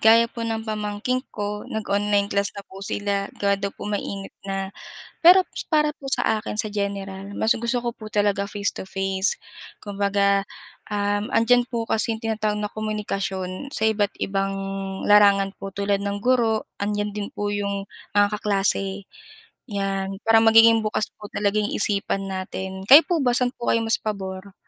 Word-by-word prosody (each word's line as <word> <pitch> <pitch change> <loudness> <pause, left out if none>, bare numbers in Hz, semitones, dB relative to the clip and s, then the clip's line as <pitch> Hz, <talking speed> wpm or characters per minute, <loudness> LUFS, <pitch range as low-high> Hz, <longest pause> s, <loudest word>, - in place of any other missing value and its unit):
gaya 225 +1 +7
po 235 - -8
ng 225 -1 -2
pamangkin 215 +3 -2
ko, 210 0 -4
nag-online 205 -1 0
class 200 0 +1
na 200 - -7
po 195 0 -12
sila 200 0 -2
gawa 200 0 +1
daw 200 - -1
po - - -9
mainit 200 -1 -4
na. 195 0 -3 0.5
Pero 365 +2 +8 0.2
para 300 -1 +2
po 270 -1 -8
sa 220 -4 +1
akin 210 - -4
sa 215 - +1
general, 200 -1 -4
mas 220 - +3
gusto 235 +2 -1
ko 240 -1 -3
po 215 -1 -9
talaga 205 -1 +1
face 205 -1 0
to - - -5
face, 195 0 0 0.5
kumbaga, 200 -1 +1 0.5
um, 205 0 0
'andiyan 245 +2 +4
po 235 -2 -2
kasi 225 +1 +1
yung 220 - -12
tinatawag 215 -1 -1
na 210 0 -3
komunikasyon 200 0 -3
sa 220 - -3
iba't 210 -2 +1
ibang 195 0 -1 0.5
larangan 200 -1 +5
po - - -5
tulad 200 0 0
ng 200 0 -3
guro, 235 -3 +2 0.2
andiyan 205 0 -1
din 205 -1 -4
po 205 0 -2
yung, 200 -1 -2 0.3
ah, 205 - +7
kaklase, 200 -1 0 0.7
yan. 195 -2 -2
Parang 225 0 +5
magiging 225 0 +7
bukas 215 0 -1
po 210 - -8
talaging 210 +1 0
yung - - -2
isipan 200 -1 0
natin. 190 0 -5
Kayo 290 +4 +10
po 345 - +1
ba 245 -2 +2
saan 250 -1 +3
po 240 - -5
kayo 230 - +2
mas 225 0 +2
pabor? 195 -2 -5
205 Hz, 170 wpm, -23 LUFS, 200-220 Hz, 0.7 s, Kayo